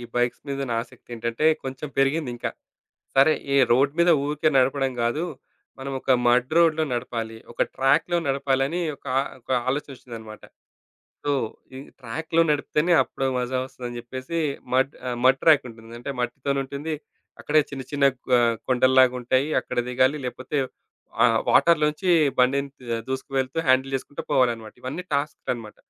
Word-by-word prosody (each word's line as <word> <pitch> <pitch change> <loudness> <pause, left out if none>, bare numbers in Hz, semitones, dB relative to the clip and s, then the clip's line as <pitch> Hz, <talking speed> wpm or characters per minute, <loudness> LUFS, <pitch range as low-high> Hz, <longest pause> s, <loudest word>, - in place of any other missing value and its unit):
ఈ 120 - -7
బైక్స్ 120 0 0
మీద 140 0 -3
ఉన్న 120 - -3
ఆసక్తేంటంటే 115 +2 -5 0.2
కొంచెం 135 +2 -5
పెరిగింది 135 0 +2
ఇంకా. - - -3 0.7
సరే, 140 +4 +6 0.2
ఈ - - +2 0.2
రోడ్ 135 +3 +3
మీద 170 0 +5
ఊరికే 150 +1 +1
నడపడం 135 0 +2
గాదు. 135 +9 0 0.5
మనం 135 +1 -5
ఒక 130 - -4 0.2
మడ్ 125 +4 +3
రోడ్‌లో 160 -2 +4
నడపాలి. 115 -2 -3 0.2
ఒక - - 0
ట్రాక్‌లో 145 +6 +2
నడపాలని 135 +4 0 0.2
ఒక - - -20 0.3
ఒక 115 - -16 0.2
ఆలోచనొచ్చిందన్నమాట. 120 -6 -6 0.8
సో, 145 - 0 0.5
ఈ - - -7 0.2
ట్రాక్‌లో 160 +7 0
నడిపితేనే 150 +3 +1
అప్పుడు 135 - -4
మజా 125 +1 -1
వస్తదని 120 -2 -7
చెప్పేసి, 130 +7 -5 0.4
మడ్ 135 +2 +2
ఆహ్, 120 -1 -3
మడ్ 135 +1 +5
ట్రాకుంటుంది. 120 -7 +2
అంటే 140 +3 -5
మట్టితోనే 135 +2 -1
ఉంటుంది. 145 +4 -4 0.5
అక్కడే 155 +1 +3
చిన్న, 135 -1 -5
చిన్న 140 -1 +1 0.3
ఆహ్, 115 -1 +2
కొండల్లాగా 130 0 +4
ఉంటాయి. 130 +4 +1
అక్కడ - - -5
దిగాలి. 130 +3 +2
లేకపోతే 130 +4 -4 0.7
ఆ - - +7 0.3
వాటర్‌లో 165 -3 +5
నుంచి 180 +4 -2 0.3
బండిని 140 +2 +3 0.4
దూసుకువెళ్తూ 130 +2 -2
హ్యాండిల్ 130 +1 +3
చేసుకుంటూ 140 +2 -7
పోవాలన్నమాట. 115 -4 +1
ఇవన్నీ 135 +8 -4
టాస్క్‌లన్నమాట. 125 -6 -3
135 Hz, 140 wpm, -24 LUFS, 125-145 Hz, 0.8 s, ఆ